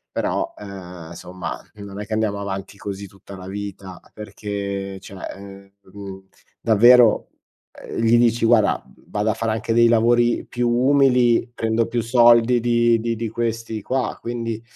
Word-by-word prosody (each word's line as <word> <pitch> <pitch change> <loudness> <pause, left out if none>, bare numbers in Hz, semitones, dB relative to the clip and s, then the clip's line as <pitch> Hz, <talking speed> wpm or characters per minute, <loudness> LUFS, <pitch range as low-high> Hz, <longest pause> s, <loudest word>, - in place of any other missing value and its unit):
però, - - -2
ehm, 90 -5 -10
somma 90 +1 -7
non 100 -1 -9
è - - -6
che 110 - -6
andiamo 110 -2 -1
avanti 95 0 -6
così 100 0 -6
tutta 100 0 -13
la 95 0 -10
vita" 100 -2 -7
perché 100 -2 -5
cioè 100 0 -11 0.2
ehm, 100 0 -13 0.2
mhmm, 95 -1 -10 0.3
davvero, 115 +1 +5 0.4
ehm, - - -9
gli 115 +1 +4
dici: 120 -1 +2
"Guarda, 115 -2 +3 0.3
vado 105 +1 -1
a - - -2
fare 115 0 -2
anche 110 +1 -2
dei 115 0 +5
lavori 120 +1 +2
più 120 0 -1
umili, 125 -2 +3
prendo 115 0 0
più 120 0 -1
soldi 120 0 +5
di 120 -1 +3
di 115 +1 -2
di 115 +1 -3
questi 115 -1 -3
qua" 130 +4 -2
quindi 115 -1 -4
110 Hz, 155 wpm, -21 LUFS, 100-120 Hz, 0.4 s, davvero